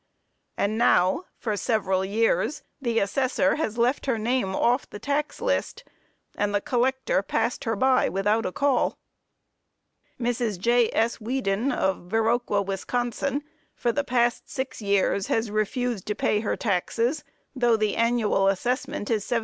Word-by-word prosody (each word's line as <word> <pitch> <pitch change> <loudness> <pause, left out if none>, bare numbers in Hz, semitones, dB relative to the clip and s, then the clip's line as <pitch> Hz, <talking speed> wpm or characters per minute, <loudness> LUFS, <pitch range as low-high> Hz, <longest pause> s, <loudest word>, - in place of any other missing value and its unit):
And 215 +2 0
now, 190 - +3
for 215 -3 -2
several 195 -4 0
years, 225 +8 0 0.2
the 235 -3 -1
assessor 260 +7 +1
has 235 -8 -2
left 245 +4 +1
her 250 -4 +1
name 220 -3 0
off 245 +3 +1
the - - -8
tax 285 +7 -2
list, - - -1 0.5
and 205 0 0
the - - +3
collector 260 - 0
passed - - -1
her 225 -1 0
by 260 +4 +3
without 210 +4 +1
a - - -3
call. 275 +3 +1 1.2
Mrs. 235 -4 -1
J.S. 235 +2 +2
Weeden, 235 0 -1
of 190 -6 -1
Viroqua, 225 -1 +1
Wis., 195 -1 -3 0.9
for 240 - 0
the 285 +5 -1
past 240 -2 0
six 260 -3 -4
years, 200 -1 +1
has 225 -1 0
refused 215 0 -1
to 210 - -1
pay 210 - +1
her 210 - -1
taxes, 235 - 0 0.3
though 240 -3 +3
the 215 -1 0
annual 230 -4 +2
assessment 210 +2 -1
is 215 -3 +1
$75. 240 +1 0
230 Hz, 145 wpm, -25 LUFS, 205-250 Hz, 1.2 s, now